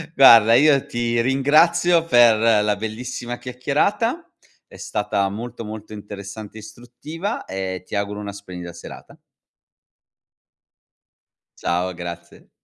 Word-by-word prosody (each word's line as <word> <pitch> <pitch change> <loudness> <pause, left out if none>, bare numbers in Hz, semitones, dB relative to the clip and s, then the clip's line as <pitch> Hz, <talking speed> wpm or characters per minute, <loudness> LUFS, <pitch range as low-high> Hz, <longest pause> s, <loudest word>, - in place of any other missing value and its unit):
Guarda, 115 -4 +7
io 145 0 +4
ti 120 0 -2
ringrazio 155 +6 +3
per 120 -6 +5 0.3
la 105 0 +1
bellissima 120 +3 -6
chiacchierata. 200 - -1 0.4
È - - -15
stata 105 -1 -2
molto, 115 +3 -7
molto 110 0 -9
interessante 105 +1 -9
e - - -8
istruttiva 135 - -7
e 95 -1 -5
ti - - -7
auguro 100 0 -3
una 100 -1 -6
splendida 90 -4 -9
serata. - - -12 2.4
Ciao, 90 +2 -1
grazie. 85 0 -9
110 Hz, 110 wpm, -21 LUFS, 100-130 Hz, 2.4 s, Guarda